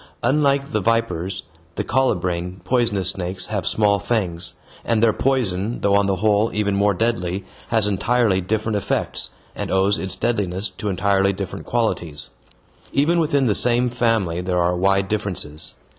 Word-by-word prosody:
Unlike 140 -1 +2
the 105 - 0
vipers, 100 -4 0 0.3
the - - -1
colubrine 90 -8 0
poisonous 105 -4 +1
snakes 90 0 -5
have - - -1
small 105 -2 +3
fangs, 95 -5 -1 0.3
and 115 -1 +1
their 110 -2 +5
poison, 115 -5 0
though 100 - +2
on 100 0 +3
the 95 - +1
whole 105 +3 +2
even 105 -1 +1
more 100 0 +2
deadly, 95 -3 -1 0.2
has 110 -3 +2
entirely 105 -1 +2
different 110 +3 -1
effects, 100 - -2 0.3
and - - -4
owes 95 +2 +2
its 95 - -2
deadliness 100 -4 -1
to 95 +2 -5
entirely 100 +1 +2
different 95 -1 -6
qualities. 85 -11 -2 0.6
Even 165 +5 +2
within 145 -4 +2
the 110 - +3
same 120 +2 +2
family 115 -8 +1
there 90 0 -1
are 90 0 +2
wide 95 +2 +2
differences. 90 -8 -3
100 Hz, 155 wpm, -21 LUFS, 95-115 Hz, 0.6 s, their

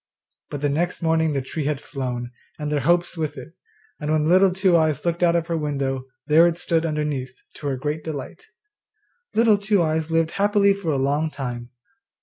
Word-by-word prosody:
But 145 - -5
the 145 - +1
next 170 +5 -1
morning 160 -1 +2
the 135 -2 -1
tree 150 +2 -4
had 145 -2 -1
flown, 125 -4 -5 0.3
and 150 -1 -4
their 150 - +1
hopes 175 +5 +1
with 155 -2 -3
it; 165 - -10 0.5
and 150 -1 -2
when 155 -1 +2
Little 185 +2 +5
Two 185 -1 +2
eyes 155 -3 +1
looked 170 0 -1
out 170 -1 +4
of 170 -1 +1
her 170 -1 -2
window 135 -4 -2 0.2
there 160 +3 +6
it 170 -1 -1
stood 165 -2 0
underneath, 150 -5 -3 0.2
to 145 - -5
her 135 -2 -1
great 150 +3 -3
delight. 160 - -7 0.9
Little 220 -2 +4
Two 200 -3 +2
eyes 160 0 -1
lived 165 0 +1
happily 200 0 +3
for 195 -4 -4
a 145 - +1
long 145 +4 +1
time. 120 -5 -5
155 Hz, 195 wpm, -23 LUFS, 145-170 Hz, 0.9 s, there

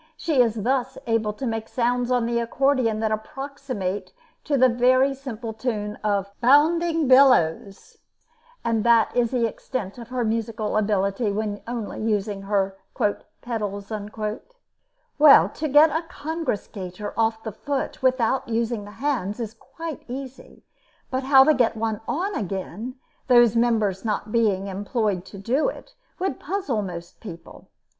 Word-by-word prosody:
She 305 -6 +2
is 225 -3 +1
thus 260 +1 0
able 225 -2 +1
to 265 +6 -6
make 225 -2 -3
sounds 245 0 0
on 245 -2 +2
the 235 0 0
accordeon 235 -2 +1
that 220 -1 0
approximate 255 -4 -4 0.3
to 290 -2 +1
the 255 0 +6
very 255 +3 +3
simple 240 -4 -6
tune 215 -2 -3
of 200 -2 0
"Bounding 320 +4 +4
Billows," 230 -8 +3 0.7
and 225 -2 +1
that 230 -2 +4
is 240 -2 +2
the 245 -2 +1
extent 225 -1 -5
of 235 - -9
her 250 -1 -1
musical 220 -1 -2
ability 205 +1 +1
when 205 0 -3
only 235 -3 -4
using 210 -2 -1
her 195 -1 -1 0.6
"pedals." 205 -4 -4
To 295 - +1
get 300 +3 +7
a 320 - 0
congress 320 - -3
gaiter 190 0 -7
off 225 0 0
the 220 - -4
foot 280 +6 -4
without 260 -1 +1
using 225 -2 -1
the - - -10
hands 250 -8 -1
is 225 -2 -4
quite 325 +5 -8
easy; 260 +1 -9 0.5
but 260 0 0
how 265 -1 +7
to 310 - +5
get 240 -4 +1
one 220 -1 -2
on 375 +7 -1
again, 200 - -4 0.3
those 240 -3 +6
members 220 -5 +1
not 215 -1 -2
being 210 -5 +2
employed 200 -1 -2
to 195 +1 -11
do 250 - +1
it, - - -11 0.2
would 365 -7 -2
puzzle 305 - -2
most 175 -3 -8
people. 170 -6 -11
230 Hz, 145 wpm, -24 LUFS, 210-265 Hz, 0.7 s, get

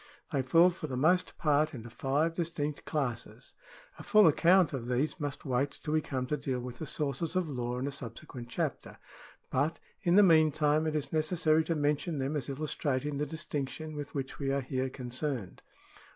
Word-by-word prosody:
They 140 - +2
fall 165 +7 +5
for 170 -3 -6
the 130 -3 -4
most 180 +7 +2
part 150 0 +2
into 120 -1 -8
five 145 +7 0
distinct 160 -4 -3
classes. 130 -7 -3 0.5
A - - -7
full 215 -1 +6
account 170 +2 +5
of 120 -3 -4
these 130 +8 0
must 145 0 -4
wait 135 +1 0
until 150 - -4
we 155 - +3
come 130 -4 -3
to 150 +4 -1
deal 130 -2 -2
with 125 -1 -7
the 155 - -4
sources 150 +5 -2
of 185 -2 +1
law 125 -3 -3
in 130 - -2
a 140 - -2
subsequent 120 -1 -8
chapter, - - -3 0.5
but 145 +5 +1 0.2
in 175 -1 +3
the 205 - +8
mean 160 -4 +6
time 150 +1 +2
it 155 - -1
is 150 0 -2
necessary 160 0 +2
to 165 - 0
mention 150 +2 0
them 135 +3 -1
as 140 -2 -2
illustrating 140 -1 -2
the 150 - -1
distinction 155 0 -4
with 145 0 -6
which 135 -1 -4
we 135 -1 0
are 140 0 +1
here 130 0 -2
concerned. 125 - -4
145 Hz, 195 wpm, -31 LUFS, 130-155 Hz, 0.5 s, the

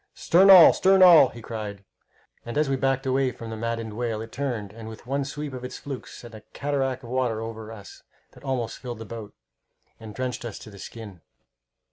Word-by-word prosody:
"Stern 190 +4 +4
all! 185 -4 +10
stern 190 0 +4
all!" 165 -7 +8
he 115 -1 -12
cried, 105 -3 -6 0.6
and, 120 +2 -6
as 150 -1 +2
we 135 - +1
backed 135 0 0
away 130 0 +1
from 115 -1 -9
the - - -4
maddened 115 -1 -4
whale, 115 -1 -3
it 115 0 -8
turned 120 -8 -4
and, 115 0 -10
with 110 +1 -11
one 140 +2 -1
sweep 145 +1 -6
of 125 -1 -7
its 125 - -6
flukes, 135 -3 -8
sent 120 -1 -12
a 110 - -10
cataract 135 -2 -2
of 120 - -10
water 125 -4 0
over 110 -1 -7
us 105 -3 -12 0.3
that - - -18
almost 125 -4 -3
filled 120 -3 -6
the 115 - -8
boat, 110 -1 -9 0.6
and 110 -2 -10
drenched 130 -1 -4
us 115 -4 -6
to 110 - -12
the 100 - -13
skin. 105 -5 -10
120 Hz, 210 wpm, -25 LUFS, 110-135 Hz, 0.6 s, all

